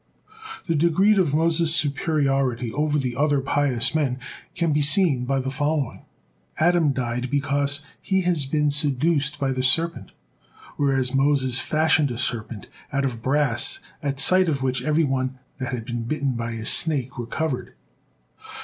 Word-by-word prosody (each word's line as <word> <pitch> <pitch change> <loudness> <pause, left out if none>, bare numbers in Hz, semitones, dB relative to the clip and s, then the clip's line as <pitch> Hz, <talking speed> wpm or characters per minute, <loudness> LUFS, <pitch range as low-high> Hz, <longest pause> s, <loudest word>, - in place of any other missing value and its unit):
The 165 - 0
degreed 170 +6 +3
of 155 -6 +1
Moses' 165 0 +3
superiority 135 -5 0
over 150 0 0
the 130 -4 -2
other 145 +1 +1
pious 135 -2 0
men 140 -5 0 0.4
can 170 -3 0
be 150 - +1
seen 145 -3 +3
by 135 +1 0
following. 145 +1 -2 0.5
Adam 165 -2 +3
died 125 -1 -3
because 140 +1 -1 0.2
he 190 -1 0
has 170 -6 -1
been 150 +1 +1
seduced 150 +1 +1
by 135 -1 0
the 130 0 -2
serpent, 165 +6 +1 0.6
whereas 135 -3 0
Moses 135 -2 +2
fashioned 155 -2 +2
a 120 - -5
serpent 115 -3 -4 0.3
out 140 -1 0
of 120 -4 -4
brass 135 -2 +2 0.2
at 140 -2 -3
sight 185 +4 +4
of 140 -4 -2
which 130 -1 -1
everyone 135 -4 0 0.2
that 130 -1 -4
had 120 -3 -5
been 120 -1 -4
bitten 140 +1 -2
by 115 0 -4
a 110 -1 -6
snake 135 -5 +1
recovered. 130 +3 -4
140 Hz, 150 wpm, -23 LUFS, 130-155 Hz, 0.6 s, sight